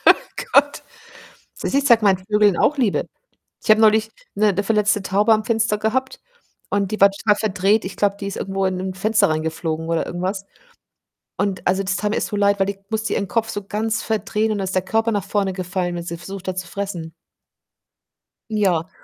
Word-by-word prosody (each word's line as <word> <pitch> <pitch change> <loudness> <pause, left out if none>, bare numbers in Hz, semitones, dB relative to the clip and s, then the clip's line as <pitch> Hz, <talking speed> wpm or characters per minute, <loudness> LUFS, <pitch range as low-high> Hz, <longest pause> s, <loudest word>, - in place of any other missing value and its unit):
Ach - - -14 0.3
Gott. 285 +1 +3 0.8
Du - - -2
siehst, - - -2
ich - - -5
zeige 230 -3 +5
mein 195 -2 +5
Vögeln 205 0 +2
auch 300 - +2
Liebe. 235 -7 +1 0.6
Ich - - -8
habe 215 +1 +5
neulich 220 0 +4 0.3
'ne 200 -1 +2
verletzte 210 -1 +2
Taube 205 +4 +3
am 215 0 +1
Fenster 225 -2 +1
gehabt 250 +5 -1 0.5
und 200 -1 0
die 215 - -3
war 200 - +8
total 205 +1 +1
verdreht, 205 0 +1
ich 185 - -6
glaube, 200 -1 +1
die 200 - -4
ist 200 - -5
irgendwo 195 0 -2
in 185 -1 -1
'n 185 0 -4
Fenster 215 +1 +2
reingeflogen 160 +1 -2
oder 165 -1 0
irgendwas, 190 +3 -3 0.9
und 195 -1 -2
also, 190 +2 +2
das 190 -1 -1
tat 210 +2 -1
mir - - -1
so - - -3
leid, 200 0 +2
weil 195 - +2
die 200 - -3
musste 220 0 -1
ihren 200 - -1
Kopf 225 +4 -1
so 205 -2 -4
ganz 220 +2 -2
verdrehen 215 0 -1
und 210 - -1
dann 195 - -1
ist 190 - -4
der 185 - +1
Körper 225 +4 0
nach 205 -3 -1
vorne 200 -2 0
gefallen, 180 -1 -3
wenn 170 - -4
sie 170 0 -5
versucht 195 +2 -9
hat 185 0 -2
zu 185 - -7
fressen. 175 -5 -5 1.4
Ja, 185 -6 +1
200 Hz, 205 wpm, -21 LUFS, 185-215 Hz, 1.4 s, war